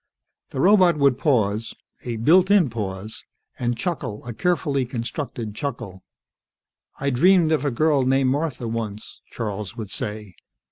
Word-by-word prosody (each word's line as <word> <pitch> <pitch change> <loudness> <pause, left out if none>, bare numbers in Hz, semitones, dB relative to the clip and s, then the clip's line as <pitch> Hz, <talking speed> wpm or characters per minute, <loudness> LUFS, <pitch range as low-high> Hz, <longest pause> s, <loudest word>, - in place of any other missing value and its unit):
The - - -5
robot 185 -1 +5
would 140 -3 +3
pause 110 -6 +1 0.3
a 120 -2 -3
built 175 - +4
in 190 - +4
pause 105 -1 -5 0.4
and 120 -1 -1
chuckle 125 - -4
a 120 - -5
carefully 145 -2 0
constructed 120 -2 -5
chuckle. 115 -7 -5 1.0
"I 140 0 0
dreamed 170 +5 +4
of 155 -1 +1
a - - +2
girl 145 +2 +2
named 130 0 +2
Martha 145 -4 -2
once," 110 -2 -5
Charles 105 -1 -5
would 110 -4 -6
say. 105 -2 -6
125 Hz, 140 wpm, -23 LUFS, 110-150 Hz, 1.0 s, robot